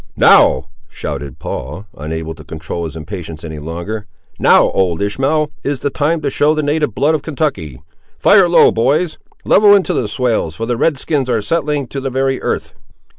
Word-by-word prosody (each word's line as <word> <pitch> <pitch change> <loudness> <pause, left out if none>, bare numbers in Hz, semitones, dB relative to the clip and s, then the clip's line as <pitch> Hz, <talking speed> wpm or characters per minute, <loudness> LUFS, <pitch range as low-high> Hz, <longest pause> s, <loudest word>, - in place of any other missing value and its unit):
"Now!" - - +5 0.3
shouted 70 -1 -6
Paul, 75 +10 -6
unable 80 +2 -5
to 75 -1 -13
control 80 +2 -6
his 80 - -7
impatience 80 -1 -7
any 80 -2 -7
longer, 85 +8 -6 0.3
"now, - - +5
old 90 -3 0
Ishmael, 135 +9 0
is 140 -2 -2
the 145 - -1
time 155 +3 0
to - - -1
show 150 +3 +2
the 155 - -1
native 150 +1 0
blood 150 +3 +2
of 155 - 0
Kentucky! 130 - -3 0.4
Fire 195 -3 +5
low, 170 - +6
boys—level 160 - +2
into 195 - +1
the 115 - -1
swales, 110 -8 -1
for 115 - -4
the 120 +1 -1
red 145 +5 +1
skins 140 -2 -1
are 115 -2 +1
settling 150 +2 -1
to 140 - -4
the 135 0 -3
very 135 +1 -1
earth!" - - -3
125 Hz, 180 wpm, -16 LUFS, -, 0.4 s, low